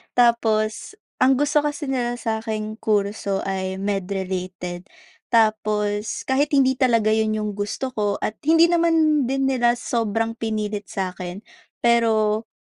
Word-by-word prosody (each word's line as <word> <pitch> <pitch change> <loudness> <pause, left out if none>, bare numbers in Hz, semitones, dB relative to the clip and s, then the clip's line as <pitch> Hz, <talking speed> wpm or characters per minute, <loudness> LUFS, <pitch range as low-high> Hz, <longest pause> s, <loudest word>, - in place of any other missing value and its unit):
Tapos, 225 - +1 0.2
ang 265 +1 +5
gusto 290 +3 +2
kasi 290 -1 -3
nila 240 -2 -1
sa 225 -2 -2
aking 215 -1 -5
kurso 200 -2 -1
ay 190 -1 -3
med 195 -1 -2
related, 185 -2 -4 0.4
tapos 215 -2 +1
kahit 270 +3 +1
hindi 265 -1 +3
talaga 230 -5 +3
iyon 220 0 +1
iyong 210 -1 -2
gusto 215 +6 -3
ko 205 -4 -1
at 215 - -2
hindi 325 +3 +5
naman 325 -3 +3
din 270 +1 0
nila 240 -2 +2
sobrang 225 -2 -1
pinilit 215 -2 -3
sa 190 -2 -3
akin. 180 +2 -8 0.4
Pero, 225 -2 +2
220 Hz, 140 wpm, -22 LUFS, 205-255 Hz, 0.4 s, ang